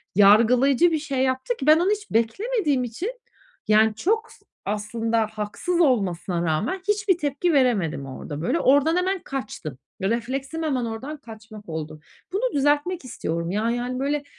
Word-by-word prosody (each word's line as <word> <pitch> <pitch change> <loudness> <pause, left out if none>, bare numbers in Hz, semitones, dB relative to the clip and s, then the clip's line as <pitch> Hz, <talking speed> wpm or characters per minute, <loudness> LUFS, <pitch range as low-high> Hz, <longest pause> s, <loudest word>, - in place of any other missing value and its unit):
yargılayıcı 240 - +5
bir 315 - +1
şey 280 -3 -3
yaptı 260 - -1
ki, 270 - -5
ben 310 +2 +7
onu 370 +4 +2
hiç 420 0 -3
beklemediğim 290 - +1
için, 335 - -4 0.6
yani, 215 0 +4
çok 440 - 0
s - - -20 0.2
aslında 225 +2 -1
haksız 220 +12 -2
olmasına 185 - +1
rağmen 210 - -1
hiçbir 415 -3 +2
tepki 295 +3 0
veremedim 205 - +1
orada 145 +3 -7
böyle. 255 - 0
Oradan 285 +5 +4
hemen 375 +1 0
kaçtım. 210 - -6 0.3
Refleksim 260 +8 -2
hemen 260 -6 0
oradan 260 +7 -5
kaçmak 220 -5 -12
oldu. 155 -1 -5 0.3
Bunu - - 0
düzeltmek 290 +4 +1
istiyorum. 170 -7 -3
Ya, 215 +3 0
yani, 245 +1 -3
böyle, 285 +1 -1
255 Hz, 150 wpm, -24 LUFS, 215-320 Hz, 0.6 s, ben